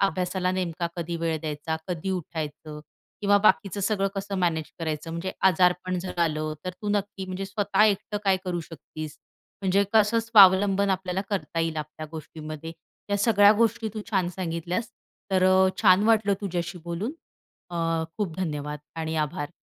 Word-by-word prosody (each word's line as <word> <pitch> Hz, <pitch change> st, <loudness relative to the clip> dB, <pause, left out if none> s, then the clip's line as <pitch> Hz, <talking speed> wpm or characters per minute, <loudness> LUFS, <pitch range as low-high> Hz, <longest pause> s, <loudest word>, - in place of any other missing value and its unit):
अभ्यासाला 185 Hz, -1 st, 0 dB
नेमका 175 Hz, -2 st, -2 dB
कधी 170 Hz, 0 st, -3 dB
वेळ 165 Hz, -1 st, -1 dB
द्यायचा, 155 Hz, +1 st, -3 dB
कधी 180 Hz, +2 st, -3 dB
उठायचं 155 Hz, -3 st, -5 dB, 0.4 s
किंवा 205 Hz, 0 st, +4 dB
बाकीचं 195 Hz, +2 st, +3 dB
सगळं 195 Hz, -1 st, +1 dB
कसं 195 Hz, 0 st, -4 dB
मॅनेज 160 Hz, -3 st, 0 dB
करायचं 160 Hz, 0 st, -3 dB
म्हणजे 170 Hz, +3 st, -4 dB, 0.2 s
आजारपण 180 Hz, 0 st, +2 dB
झालं. 160 Hz, -4 st, -1 dB
तर 185 Hz, -, -2 dB
तू 210 Hz, -, -2 dB
नक्की 205 Hz, -1 st, -1 dB
म्हणजे 185 Hz, +1 st, -4 dB
स्वतः 205 Hz, +2 st, +1 dB
एकटं 210 Hz, 0 st, 0 dB
काय 195 Hz, -1 st, +4 dB
करू 175 Hz, -2 st, -2 dB
शकतीस. 155 Hz, -1 st, -9 dB, 0.5 s
म्हणजे 195 Hz, +1 st, +3 dB
कसं 220 Hz, +1 st, +4 dB
स्वावलंबन 200 Hz, -2 st, +6 dB
आपल्याला 185 Hz, 0 st, -1 dB
करता 165 Hz, -3 st, -2 dB
येईल 165 Hz, -1 st, -1 dB
आपल्या 155 Hz, +1 st, -6 dB
गोष्टीमध्ये. 155 Hz, 0 st, -7 dB, 0.4 s
या 200 Hz, -, +2 dB
सगळ्या 205 Hz, -1 st, +6 dB
गोष्टी 225 Hz, 0 st, +1 dB
तू 215 Hz, -, -3 dB
छान 190 Hz, -4 st, +1 dB
सांगितल्यास. 180 Hz, +4 st, -2 dB, 0.4 s
तर 185 Hz, -1 st, +3 dB
अ, 190 Hz, 0 st, +5 dB
छान 185 Hz, 0 st, +6 dB
वाटलं 210 Hz, -3 st, +4 dB
तुझ्याशी 175 Hz, -2 st, -3 dB
बोलून 175 Hz, -, -3 dB, 0.6 s
अ, 175 Hz, -, -5 dB, 0.4 s
खूप 190 Hz, -7 st, -3 dB
धन्यवाद 150 Hz, -4 st, -3 dB, 0.2 s
आणि 160 Hz, 0 st, -3 dB
आभार. 150 Hz, -1 st, -5 dB
185 Hz, 155 wpm, -26 LUFS, 160-200 Hz, 0.6 s, स्वावलंबन